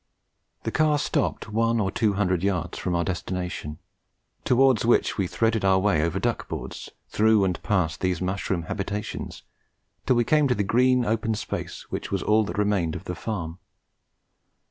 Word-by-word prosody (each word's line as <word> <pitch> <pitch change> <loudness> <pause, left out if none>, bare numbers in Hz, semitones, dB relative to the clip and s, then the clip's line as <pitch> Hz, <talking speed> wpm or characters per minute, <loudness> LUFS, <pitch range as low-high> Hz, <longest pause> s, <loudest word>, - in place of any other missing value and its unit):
The - - -2
car 155 -1 +3
stopped 105 - -1
one 115 +1 +2
or 95 -2 0
two 110 -1 +1
hundred 95 -3 +1
yards 90 -3 -1
from 90 -2 -1
our 85 - +1
destination, 90 -3 -4 0.7
towards 130 -2 +4
which 120 +1 +3
we 95 -3 0
threaded 110 +2 0
our 95 -1 +4
way 95 -5 +2
over 85 +3 0
duck 120 +3 -1
boards, - - -6 0.2
through 110 -1 +3
and 90 -2 -1
past 90 -6 0
these 90 -2 0
mushroom 95 -1 -2
habitations, 100 +4 -5 0.6
till 130 - +4
we 120 - +3
came 150 +4 +3
to 125 - +1
the 105 - 0
green 125 +4 +3
open 110 +1 0
space 105 - -5
which - - -4
was 100 - -1
all 110 +1 +3
that 105 - -5
remained 100 -6 +1
of - - -6
the 90 - -4
farm. 90 -2 -5
100 Hz, 170 wpm, -25 LUFS, 90-115 Hz, 0.7 s, towards